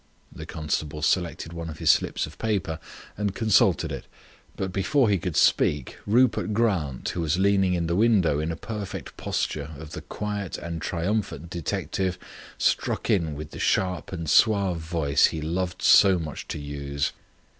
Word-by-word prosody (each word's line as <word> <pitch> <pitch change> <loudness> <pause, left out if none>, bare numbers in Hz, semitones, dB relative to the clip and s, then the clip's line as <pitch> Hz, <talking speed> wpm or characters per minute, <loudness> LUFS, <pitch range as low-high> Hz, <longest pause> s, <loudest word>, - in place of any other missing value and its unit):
The - - -9
constable 75 -1 -3
selected 85 0 0
one 85 -1 -5
of 80 - -7
his - - +5
slips - - 0
of - - -13
paper 95 -7 -1 0.4
and 100 -1 -2
consulted 110 -3 +3
it, - - -6 0.5
but 95 -1 -3
before 115 +6 +2
he 100 -2 +2
could 90 -2 -3
speak 75 - +2
Rupert 115 -1 +3
Grant, 95 - 0
who 90 - -3
was 80 +1 +1
leaning 95 -1 +3
in 85 -1 -1
the 85 +1 0
window 100 -8 +3
in 80 +2 -1
a - - -3
perfect 105 -1 -6
posture 75 0 -2
of 75 +1 -10
the - - -6
quiet 105 -2 -4
and 85 -1 -5
triumphant 85 -2 -2
detective, 90 +2 -2 0.4
struck - - 0
in 80 -6 +1
with 75 +1 -7
the - - -8
sharp 90 -4 0
and 85 -4 -5
suave 100 -1 +4
voice 80 -3 +2
he 80 - -4
loved 90 +3 -3
so 95 -2 +7
much 80 -5 -6
to - - -4
use. 70 -1 -3
85 Hz, 165 wpm, -26 LUFS, 80-100 Hz, 0.5 s, so